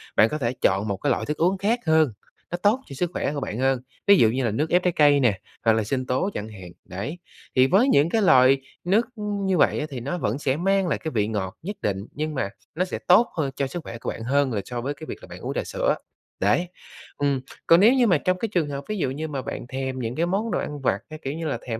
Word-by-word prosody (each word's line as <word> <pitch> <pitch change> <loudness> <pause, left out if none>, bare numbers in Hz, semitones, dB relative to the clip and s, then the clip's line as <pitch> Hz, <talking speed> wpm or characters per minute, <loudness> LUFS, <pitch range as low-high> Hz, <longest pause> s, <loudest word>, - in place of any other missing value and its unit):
bạn 110 - +5
có 150 - -2
thể 120 -3 -1
chọn 100 +3 +2
một 100 - -2
cái 145 - -1
loại - - 0
thức 150 +1 -3
uống 180 +4 +2
khác 220 +5 +1
hơn, 160 -6 +3 0.4
nó 175 - -1
tốt 210 +7 +2
cho 135 - -9
sức 175 +5 -1
khỏe 145 - -1
của 145 - -2
bạn 120 -4 -4
hơn, 130 -1 +2 0.3
ví 200 -1 +8
dụ 110 - +5
như 130 +2 -1
là 115 - +1
nước 150 +9 -1
ép 180 +1 +3
trái 180 -2 +2
cây 145 -2 +5
nè 115 -8 +2 0.3
hoặc 115 - +6
là 110 - +1
sinh 130 +4 -2
tố 130 +11 0
chẳng 105 +1 -5
hạn, 95 -4 -10
đấy. 120 - -6 0.4
Thì 130 +1 +5
với 200 - +4
những 145 - +4
cái 225 +4 +1
loại 135 -6 +5 0.2
nước, 205 +7 +3
ưm, 205 -2 -3
như 190 -1 +2
vậy - - +3
á 150 - -2
thì 130 -3 -5
nó 140 +9 -3
vẫn 140 - -1
sẽ 135 -1 0
mang 195 +2 +2
lại - - 0
cái 160 - -4
vị 105 -3 +1
ngọt 100 -4 -3
nhất 205 +5 -4
định 100 -2 0
nhưng 155 +1 -3
mà 100 -7 -1 0.3
nó 180 +3 +1
sẽ 185 - -5
tốt 185 +7 +6
hơn 140 -4 0
cho 140 - -1
sức 170 +4 -6
khỏe 115 - -7
của - - -4
bạn 115 - -5
hơn 135 +1 +1
là 100 - -1
so 120 -1 -4
với 140 +4 -2
cái 155 +2 -10
việc - - -5
là - - -12
bạn - - -10
uống - - -4
trà - - -1
sữa, - - 0 0.4
đấy. 105 - +2 0.5
Ừm, 140 -2 0 0.3
còn 165 +1 +7
nếu 225 +6 +7
như 250 -3 +4
mà 175 -6 +4
trong 185 +4 0
cái 225 - -2
trường 165 -5 +1
hợp 140 0 -5
ví 215 - -2
dụ 135 -8 0
như 155 +3 -4
mà 140 -3 -4
bạn 120 - -6
thèm 130 0 -4
những 115 0 -3
cái 165 - +1
món 200 +6 -1
đồ - - 0
ăn 145 -2 -5
vặt, - - +1
cái 155 0 -8
kiểu 135 - -3
như 160 +1 -4
là, 145 - -1
thèm 115 -1 -3
145 Hz, 290 wpm, -24 LUFS, 125-180 Hz, 0.5 s, ví